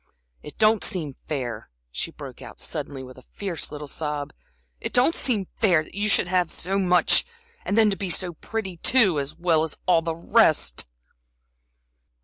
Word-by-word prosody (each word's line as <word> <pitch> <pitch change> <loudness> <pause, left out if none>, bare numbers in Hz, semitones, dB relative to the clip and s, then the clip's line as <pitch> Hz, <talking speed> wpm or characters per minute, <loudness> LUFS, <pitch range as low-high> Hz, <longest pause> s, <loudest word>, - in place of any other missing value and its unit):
"It 150 - -11
don't 215 -1 +4
seem 155 -7 -1
fair," 130 -6 -4 0.2
she - - -3
broke - - -10
out, - - -11
suddenly, 135 -2 -5
with 130 0 -11
a 130 - -24
fierce 190 -5 -3
little 150 0 -7
sob; 150 -1 -4 0.5
"it - - -4
don't 250 +7 +4
seem 215 -7 +1
fair, 175 -8 +4
that - - -16
you 205 +2 -1
should 190 - +3
have 180 -2 +1
so 195 +3 0
much 180 -2 +4 0.4
and 205 - -1
then 220 -2 +5
to - - -1
be 190 0 -3
so 175 +1 -1
pretty 190 +1 -5
too, 195 - +4
as 140 +2 -4
well 170 -2 +2
as 160 -1 -3
all 175 -3 +4
the 165 0 -3
rest!" 160 - +2
175 Hz, 175 wpm, -24 LUFS, 150-200 Hz, 0.5 s, then